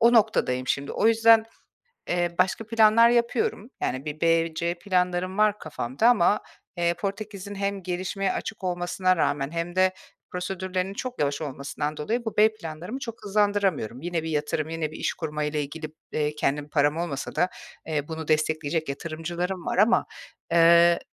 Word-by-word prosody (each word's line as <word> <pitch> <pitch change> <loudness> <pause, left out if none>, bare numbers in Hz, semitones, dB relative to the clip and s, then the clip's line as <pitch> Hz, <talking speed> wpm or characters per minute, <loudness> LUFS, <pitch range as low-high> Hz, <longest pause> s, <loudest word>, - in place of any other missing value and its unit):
o 235 +1 +6
noktadayım 130 - +2
şimdi. 140 +2 -1
O - - +1
yüzden, 225 0 +6 0.6
eee, 175 -1 0
başka 190 +4 +1
planlar 225 +1 +6
yapıyorum. 235 -1 0
Yani, 130 +2 -2
bir 155 0 -6
B, 165 -1 +2
C 170 +2 -1
planlarım 180 +1 -1
var 210 -1 +3
kafamda 145 - 0
ama, 210 -3 +4 0.4
eee, 170 0 +1
Portekiz'in 200 +2 -5
hem 200 0 -2
gelişmeye 185 +2 -2
açık 205 -3 -5
olmasına 180 +1 +1
rağmen 145 -3 0
hem 170 +2 -4
de 185 0 +4 0.4
prosedürlerinin 185 +1 -3
çok 250 +2 -5
yavaş 140 -1 0
olmasından 145 +1 -4
dolayı, 230 +12 -2
bu 225 - -4
B 215 +1 +5
planlarımı 175 +4 -6
çok 230 -4 -8
hızlandıramıyorum. 200 - +1
Yine 170 -1 -2
bir 160 - -4
yatırım, 150 0 -1
yine 160 -2 -3
bir 155 - -9
iş - - -1
kurmayla 150 -1 -2
ilgili, 155 +2 -5 0.3
eee, 150 0 0
kendim 145 0 -1
param 145 0 +2
olmasa 165 -5 -4
da, 180 - +3 0.4
eee, 150 -2 -2
bunu 160 -1 -6
destekleyecek 155 0 0
yatırımcılarım 170 +5 -4
var - - -1
ama. 220 +4 +4 0.5
Eee, 170 0 +6
175 Hz, 160 wpm, -26 LUFS, 155-200 Hz, 0.6 s, o